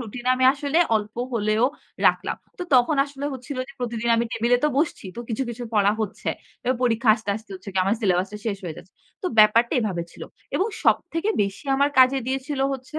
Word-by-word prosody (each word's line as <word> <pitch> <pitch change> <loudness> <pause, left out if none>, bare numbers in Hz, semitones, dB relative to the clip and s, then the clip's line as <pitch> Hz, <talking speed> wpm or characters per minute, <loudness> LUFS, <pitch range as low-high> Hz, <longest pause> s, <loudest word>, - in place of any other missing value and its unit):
Routine 240 +1 -7
আমি 255 0 +1
আসলে 290 +3 0 0.2
অল্প 210 0 -5 0.2
হলেও 215 +1 +1 0.4
রাখলাম। - - +1 0.2
তো 360 - -3
তখন 255 +4 +4
আসলে 280 0 -8
হচ্ছিল 260 +1 -7
যে - - -11
প্রতিদিন 235 -1 -2
আমি 235 - +1
টেবিলে 235 +2 +2
তো - - +4
বসছি। 305 -6 -1
তো - - -4
কিছু, 230 +3 -1
কিছু 240 +1 -6
পড়া 205 0 +4
হচ্ছে। 215 -1 -4 0.3
এবার 255 0 0
পরীক্ষা 235 -1 +1
আসতে, 215 -2 -5
আসতে 220 -1 -13
হচ্ছে 185 +2 -10
কি 190 - -1
আমার 200 +3 +2
সিলেবাসটা 190 0 0
শেষ 205 -3 -1
হয়ে 165 -3 -5
যাচ্ছে। 180 - -14 0.3
তো 370 - -1
ব্যাপারটা 225 +3 +6
এভাবে 185 -6 -2
ছিল। - - -11 0.3
এবং 385 - +1 0.2
সবথেকে 330 +6 +1
বেশি 200 +7 -4
আমার 280 +1 +3
কাজে 260 +1 +6
দিয়েছিল 270 +1 -2
হচ্ছে 265 +4 -7
235 Hz, 200 wpm, -24 LUFS, 210-270 Hz, 0.4 s, ব্যাপারটা